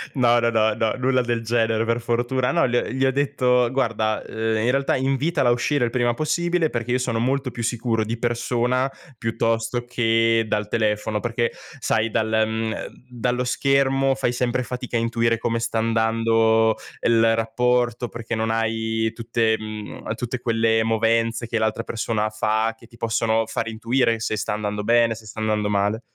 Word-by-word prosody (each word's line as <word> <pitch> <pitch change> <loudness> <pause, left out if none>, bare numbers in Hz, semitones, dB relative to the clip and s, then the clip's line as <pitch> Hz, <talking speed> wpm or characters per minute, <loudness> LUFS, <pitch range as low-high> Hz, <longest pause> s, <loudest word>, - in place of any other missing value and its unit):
no, 120 -2 +4
no, 115 0 +2
no, 110 -1 +2
no, 110 -1 0
nulla 130 0 +2
del 120 -1 -1
genere 115 -1 +1
per 115 +1 0
fortuna. 120 +2 0
No, 170 -5 +2
gl 120 0 0
gli 130 +2 0
ho 130 - +3
detto: 125 -3 +2
"Guarda, 110 -5 0
uhm, - - -11 0.2
in 115 +3 +2
realtà 135 +1 +1
invitala 135 +1 +1
a - - +5
uscire 125 +2 +1
il 115 - -3
prima 120 -1 +1
possibile, 165 +4 0
perché 120 -1 -3
io 125 - +3
sono 125 -3 -1
molto 130 +2 0
più 115 0 -5
sicuro 115 -1 0
di 115 +2 -3
persona 120 +2 0 0.3
piuttosto 115 +1 -1
che 115 -1 +2
dal 105 0 -1
telefono." 105 -1 0
Perché, 120 +1 -1 0.3
sai, 110 -2 +1
dal 110 +1 0 0.2
mhmm, 110 0 -2
ehm, - - -5 0.2
dallo 125 +1 -1
schermo 135 +1 +2
fai 125 -2 0
sempre 125 0 0
fatica 125 0 -5
a - - +1
intuire 115 0 +1
come 115 +1 -1
sta 115 -1 -1
andando 115 0 +2 0.3
il 115 -1 +4
rapporto, 120 +1 0
perché 115 0 -5
non 110 0 -1
hai 110 0 -1
tutte 115 -1 0
mhmm, 110 0 -6
tutte 120 +1 -4
quelle 115 -2 +2
movenze 115 +1 +1
che 115 - -1
l'altra 110 +1 0
persona 110 -2 -2
fa, 110 +1 0
che 115 - -17
ti 120 - -18
possono 115 -1 +1
far 115 0 -3
intuire 115 +1 0
se 110 0 -2
sta 105 - -2
andando 105 0 -3
bene, 115 +1 +3
se 110 0 -13
sta 110 +1 -9
andando 105 -1 0
male. 105 +2 0
115 Hz, 180 wpm, -23 LUFS, 110-125 Hz, 0.3 s, a